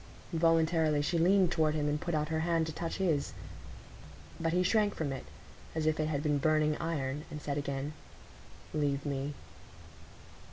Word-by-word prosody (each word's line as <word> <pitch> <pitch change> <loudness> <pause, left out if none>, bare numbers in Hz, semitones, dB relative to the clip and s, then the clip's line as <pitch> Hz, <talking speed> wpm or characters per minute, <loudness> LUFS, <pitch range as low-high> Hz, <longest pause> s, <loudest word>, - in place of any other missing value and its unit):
Involuntarily 160 -2 +3
she 170 +3 +1
leaned 185 +1 +4
toward 155 -2 +2
him 150 -1 0
and 150 0 0
put 170 -2 -1
out 150 0 0
her 160 0 0
hand 165 0 +1
to 160 - -5
touch 165 +1 -3
his. 165 -7 0 1.1
But 165 0 0
he 180 +2 +2
shrank 210 +1 +2
from 145 -4 -2
it 135 - -6 0.5
as 160 -1 0
if 155 0 +2
it 155 - +1
had 145 -2 -1
been 150 -2 +2
burning 155 0 +3
iron, 145 -3 -2
and 150 - -6
said 145 -1 -3
again,— 140 +1 -3 0.8
"Leave 145 -2 0
me." 140 0 -2
155 Hz, 170 wpm, -32 LUFS, 145-165 Hz, 1.1 s, leaned